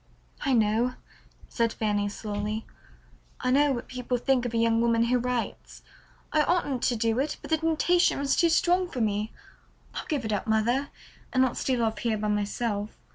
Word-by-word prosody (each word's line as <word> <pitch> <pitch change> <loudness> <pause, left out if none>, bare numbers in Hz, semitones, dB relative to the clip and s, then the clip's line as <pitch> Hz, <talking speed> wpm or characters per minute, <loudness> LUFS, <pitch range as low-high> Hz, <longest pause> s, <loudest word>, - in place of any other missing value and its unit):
"I 275 - +2
know," 230 +2 +2 0.5
said 230 -1 0
Fanny 205 -2 0
slowly. 210 +1 -4 0.7
"I 255 - 0
know 285 +2 +4
what 240 -3 -3
people 250 0 -2
think 250 0 +1
of 235 - -7
a - - +2
young 230 0 +3
woman 230 -1 +3
who 245 +1 +2
writes. 250 -1 -4 0.5
I 310 - +4
oughtn't 295 -6 0
to 245 - +2
do 225 +1 +1
it, 290 +3 -1
but - - -9
the 320 - +4
temptation 325 +2 +2
was 280 0 +1
too 340 - +4
strong 355 +2 +2
for 255 - -5
me. 215 -1 0 0.6
I'll - - -6
give 285 -7 -1
it 215 - -1
up, 205 - -2
mother, 235 +6 +1 0.4
and 255 0 +3
not 255 - 0
steal 250 -3 0
off 220 -2 -1
here 225 -1 0
by 210 0 -2
myself. 210 0 -2
240 Hz, 185 wpm, -27 LUFS, 220-270 Hz, 0.7 s, know